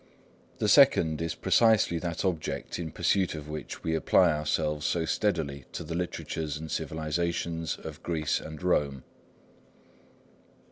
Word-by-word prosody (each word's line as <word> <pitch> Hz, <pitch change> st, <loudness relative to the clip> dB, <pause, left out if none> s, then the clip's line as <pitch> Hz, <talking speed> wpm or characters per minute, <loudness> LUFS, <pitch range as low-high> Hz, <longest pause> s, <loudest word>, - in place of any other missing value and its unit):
The -, -, 0 dB
second 80 Hz, -1 st, +5 dB
is 85 Hz, 0 st, -2 dB
precisely 110 Hz, -7 st, +3 dB
that 85 Hz, +2 st, -3 dB
object 85 Hz, -2 st, -2 dB
in 80 Hz, -2 st, -4 dB
pursuit 90 Hz, +2 st, +1 dB
of 75 Hz, -1 st, -7 dB
which 75 Hz, 0 st, -7 dB
we 80 Hz, -, 0 dB
apply 80 Hz, -, +4 dB
ourselves 75 Hz, 0 st, -1 dB
so 85 Hz, -2 st, 0 dB
steadily 80 Hz, -10 st, -1 dB
to -, -, -4 dB
the 80 Hz, -, -6 dB
literatures 80 Hz, -3 st, -3 dB
and 80 Hz, 0 st, -7 dB
civilisations 80 Hz, +1 st, -2 dB
of -, -, -9 dB
Greece 80 Hz, -3 st, -1 dB
and 80 Hz, +1 st, -9 dB
Rome. 70 Hz, -7 st, +1 dB
80 Hz, 135 wpm, -28 LUFS, 75-85 Hz, -, second